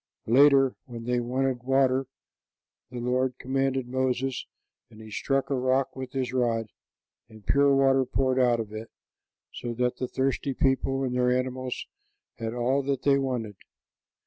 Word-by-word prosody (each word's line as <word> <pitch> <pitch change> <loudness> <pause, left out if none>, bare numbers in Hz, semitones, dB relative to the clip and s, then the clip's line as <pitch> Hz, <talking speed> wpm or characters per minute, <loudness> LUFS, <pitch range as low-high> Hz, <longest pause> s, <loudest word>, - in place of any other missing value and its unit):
Later, 135 +2 +5
when 120 -3 -8
they 125 +1 0
wanted 130 +1 -1
water, 135 0 +2 0.8
the 125 - -8
Lord 125 +1 0
commanded 135 0 -1
Moses, 130 0 -1 0.4
and 110 -2 -16
he 110 -1 -11
struck 135 +5 -1
a - - +2
rock 130 +1 +1
with 130 -1 -7
his 130 -2 -2
rod, 115 -3 0 0.6
and 110 -1 -15
pure 140 0 +4
water 135 -1 +4
poured 130 +1 0
out 120 -2 +3
of 110 -2 -5
it, 110 +1 -7 0.6
so 120 -1 -5
that 125 +1 0
the 130 - -2
thirsty 135 +1 -1
people 135 0 +1
and 130 -2 -1
their 125 0 +2
animals 130 0 -2 0.5
had 115 +1 -3
all 130 +3 +1
that 140 0 -2
they 140 -1 +4
wanted. 120 -7 -3
130 Hz, 155 wpm, -27 LUFS, 120-135 Hz, 0.8 s, Later